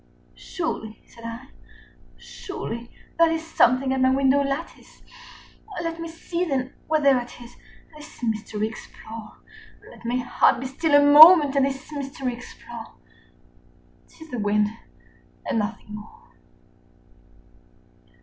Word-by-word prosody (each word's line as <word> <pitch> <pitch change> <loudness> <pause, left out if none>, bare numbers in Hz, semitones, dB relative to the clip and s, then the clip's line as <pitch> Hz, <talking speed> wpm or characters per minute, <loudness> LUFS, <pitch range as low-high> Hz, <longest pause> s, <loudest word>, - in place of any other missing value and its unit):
"Surely," 220 - -5
said 230 - -17
I, 230 +4 -8 0.7
"surely 235 - -7 0.3
that 335 -1 +6
is 325 0 -3
something 260 -3 +2
at 265 - -1
my 260 - +4
window 270 +1 +3
lattice; 275 +4 -5 0.8
Let 330 0 -4
me 330 - -5
see, 335 +1 -4
then, 265 -6 -2
what 310 -1 +1
thereat 255 -4 +2
is, 240 -1 -13 0.4
and 305 - -13
this 300 -4 -14
mystery 215 -1 -2
explore; 220 0 -11 0.5
Let - - -16
my 235 +1 -2
heart 250 -1 +2
be 260 - -6
still 290 +3 0
a 285 - +4
moment 295 0 +9
and 275 -1 +3
this 270 +2 -7
mystery 275 -3 -4
explore: 240 +1 -11 1.1
35 - - -23
'T 320 - -12
is 320 - -18
the 245 - -3
wind 210 0 +1 0.8
and 225 - 0
nothing 210 0 -5
more." 450 - -12
265 Hz, 135 wpm, -24 LUFS, 235-305 Hz, 1.1 s, moment